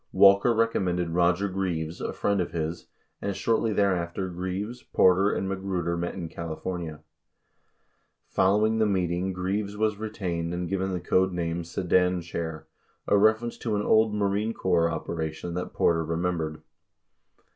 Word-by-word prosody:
39 - - -6
Walker 100 +3 +7
recom 115 -1 +2
mended 90 -1 0
Roger 90 +3 +2
Greaves, 90 -4 -3
a - - -2
friend 100 -2 0
of 90 - -4
his, 80 0 -3 0.3
and 100 -1 -2
shortly 115 +1 +1
thereafter 95 -2 0
Greaves, 95 +7 -4
Porter, 95 +2 +4
and 95 - -1
Magruder 95 -3 -2
met 85 0 -3
in 90 -4 -4
California. 85 -1 -5 1.3
Following 105 +4 +3
the 110 - +3
meeting 90 -1 0
Greaves 100 +3 -2
was 110 -1 +1
retained 90 -6 -3
and 90 0 -3
given 95 +1 -1
the 90 - -2
code 95 +2 +2
name 85 -1 -2
"Sedan 90 +1 +1
Chair," 80 -2 -5 0.4
a - - +4
ref 110 +2 +4
erence 120 0 -5
to 110 -3 -1
an 105 - 0
old 110 0 +3
Marine 105 +2 0
Corps 85 -3 +2
operation 80 +1 -4
that 90 +1 -4
Porter 80 -1 +2
remembered. 80 -1 -2
90 Hz, 155 wpm, -27 LUFS, 85-100 Hz, 1.3 s, Walker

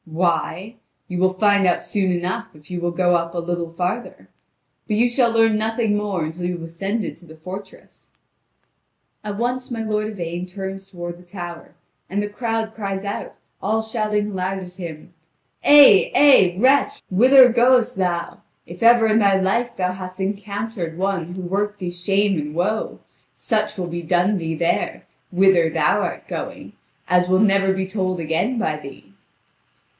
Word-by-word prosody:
"Why? 175 +5 -1 0.3
you 180 -1 -4
will 185 0 +3
find 200 -1 +3
out 175 - +1
soon 195 -3 0
enough, 180 +1 -2
if 150 +3 -17
you 175 -1 -4
will 175 - 0
go 175 0 +2 0.2
a 175 - -4
little 170 -1 -3
farther. 180 +8 -4 0.6
But 215 - 0
you 240 +2 +4
shall 240 0 +2
learn 225 -1 +3
nothing 225 0 0
more 200 -5 -2
until 165 +3 -5
you 180 - -1
have 170 -2 -7
ascended 195 +5 -4
to 170 - -18
the 160 -1 -13
fortress." 190 +4 -11 1.1
At 205 -1 -5
once 250 +2 -2
my 230 -2 -4
lord 215 -1 -1
Yvain 175 -3 -5
turns 195 +1 -7
toward 175 -2 -7
the - - -16
tower, 175 -2 -9 0.3
and 200 +2 -1
the 205 - -2
crowd 225 0 -3
cries 195 -2 -4
out, 200 - -5 0.2
all 220 +2 0
shouting 215 -2 -1
aloud 190 0 -2
at 180 -1 -10
him: 170 -2 -9 0.5
"Eh, 285 -9 +7
eh, 260 -12 +6
wretch, 270 +4 +3
whither 255 +6 +7
goest 245 0 +3
thou? 175 -3 -2 0.2
If 175 +1 -11
ever 230 0 +6
in 220 0 +3
thy 200 -2 +3
life 230 +6 -1
thou 180 -1 0
hast 185 0 -8
encountered 200 -2 -4
one 180 -2 -2
who 185 - -6
worked 205 +3 -2
thee 180 -2 -4
shame 195 +1 0
and 150 +1 -5
woe, 210 +6 -1 0.4
such 215 -2 -1
will 180 -2 -3
be 175 0 -5
done 180 +4 +1
thee 165 -1 -3
there, 170 +2 -1 0.3
whither 180 -3 +4
thou - - +1
art - - -4
going, - - -6 0.3
as 180 0 +2
will 185 0 +3
never 195 -2 +3
be 190 0 -1
told 185 -2 -2
again 170 +10 -1
by 155 -9 -1
thee." 140 -2 -11
190 Hz, 170 wpm, -21 LUFS, 175-215 Hz, 1.1 s, Eh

